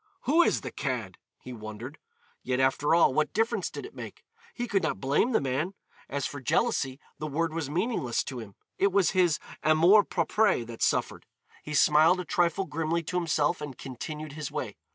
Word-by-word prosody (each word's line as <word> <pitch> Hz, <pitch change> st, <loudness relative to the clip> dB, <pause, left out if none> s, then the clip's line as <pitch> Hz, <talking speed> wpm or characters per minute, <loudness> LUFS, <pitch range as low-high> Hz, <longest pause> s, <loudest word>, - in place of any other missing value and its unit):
"Who 305 Hz, +7 st, +4 dB
is -, -, +2 dB
the -, -, -6 dB
cad," -, -, -4 dB, 0.2 s
he 125 Hz, -, -8 dB
wondered. 110 Hz, +6 st, -8 dB, 0.4 s
Yet, 125 Hz, 0 st, -1 dB
after 135 Hz, +4 st, +3 dB
all, 170 Hz, -5 st, +5 dB
what 155 Hz, +2 st, +1 dB
difference 225 Hz, -2 st, 0 dB
did -, -, -7 dB
it 410 Hz, -, -11 dB
make? -, -, -9 dB, 0.3 s
He 245 Hz, 0 st, -3 dB
could 200 Hz, -4 st, +1 dB
not -, -, -1 dB
blame 140 Hz, -, +2 dB
the 225 Hz, -, +3 dB
man. 140 Hz, +8 st, -2 dB, 0.3 s
As 140 Hz, -1 st, -2 dB
for 145 Hz, -, -5 dB
jealousy, 135 Hz, -, 0 dB, 0.2 s
the 155 Hz, -, -3 dB
word 160 Hz, +2 st, -1 dB
was 160 Hz, -4 st, -3 dB
meaningless 165 Hz, -, -1 dB
to 130 Hz, -3 st, -6 dB
him. 100 Hz, -4 st, -10 dB, 0.2 s
It 200 Hz, 0 st, +3 dB
was 190 Hz, -3 st, +3 dB
his 180 Hz, -4 st, +3 dB, 0.2 s
amour 170 Hz, +7 st, +6 dB
propre 185 Hz, -, +1 dB
that 115 Hz, 0 st, -10 dB
suffered. -, -, 0 dB, 0.3 s
He 150 Hz, -, -5 dB
smiled 155 Hz, +5 st, +5 dB
a 180 Hz, -, -4 dB
trifle 175 Hz, 0 st, +1 dB
grimly 165 Hz, 0 st, -1 dB
to 170 Hz, -, -5 dB
himself 155 Hz, -4 st, +1 dB
and 145 Hz, -4 st, -6 dB
continued 150 Hz, +4 st, -7 dB
his 155 Hz, +1 st, -5 dB
way. -, -, -4 dB
155 Hz, 190 wpm, -28 LUFS, 135-185 Hz, 0.4 s, amour